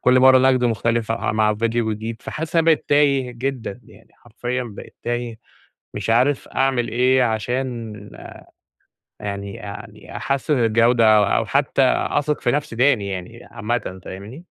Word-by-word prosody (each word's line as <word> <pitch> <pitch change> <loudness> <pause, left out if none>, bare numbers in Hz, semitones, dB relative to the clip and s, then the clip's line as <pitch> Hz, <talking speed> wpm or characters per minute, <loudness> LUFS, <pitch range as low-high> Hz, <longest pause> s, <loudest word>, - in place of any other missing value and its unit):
كل 125 0 +4
مرّة 130 0 +7
نقد 130 -1 +3
مختلف 115 0 0
ع 115 -1 -1
مع 105 0 +2
ڤيديو 115 0 0
جديد 110 +1 -5
فحاسس 160 +2 -4
إن - - +6
أنا 165 - +2
بقيت 160 -2 +3
تايه 140 -3 +3
جدًا 125 -2 -4
يعني - - -19
حرفيًا 120 +2 -4
بقيت 105 -4 -11
تايه 120 -1 -3 0.6
مش - - -4
عارف 130 +5 +2
أعمل 130 -3 0
إيه، 125 +2 +3
عشان 115 0 -2 1.2
يعني 100 -1 -5
يعني 105 +2 -10
أحسِّن 140 +3 -1
الجودة 115 -1 +4
أو 105 - +5
أو 105 +2 +1
حتّى 135 +3 +1
أثق 150 +3 0
في - - +1
نفسي 145 -5 -2
تاني 125 -5 +2
يعني 95 -2 -7
عامةً 105 -4 -3
فاهمني؟ 105 - -9
120 Hz, 150 wpm, -21 LUFS, 110-130 Hz, 1.2 s, مرّة